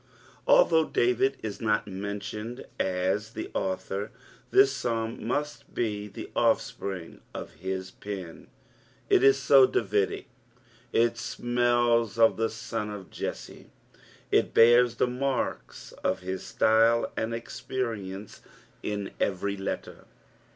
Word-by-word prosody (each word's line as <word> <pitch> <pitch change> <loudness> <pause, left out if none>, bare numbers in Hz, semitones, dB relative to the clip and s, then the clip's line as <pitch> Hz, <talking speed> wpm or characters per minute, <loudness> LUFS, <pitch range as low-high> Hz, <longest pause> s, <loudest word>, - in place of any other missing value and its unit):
AJihovgh - - +5
David 125 +2 +2
in 110 -2 -3
not 105 -2 +1
menJionetl 105 +4 -5
as 95 +4 0
the - - -6
author, 95 +2 -2 0.4
tlus 400 +1 +6
Psalm 115 -1 -2
must 150 +4 -3
be 105 -3 -1
the 100 - -9
offspring 95 -4 -1
of - - -6
his 95 0 -4
pen; 95 -5 -8 0.6
il - - +5
is 135 0 +6
so 135 -1 +6
Davidie, 100 -4 0 0.7
it 115 0 +3
smdls 120 -1 +1
of 115 -1 +5
the 115 0 +1
son 115 -1 -4
of 100 -3 -8
Jesse, - - -6 0.6
it - - +2
bears 120 +1 +6
the - - +2
marks 130 +2 -3
<^ - - +1
his 95 +1 -5
Ktyle 115 +1 +3
and 110 +1 -2
K^perience 115 -4 -5 0.4
in 100 -2 -3
every 100 +1 0
letter. 95 0 -5
115 Hz, 115 wpm, -28 LUFS, 100-120 Hz, 0.7 s, tlus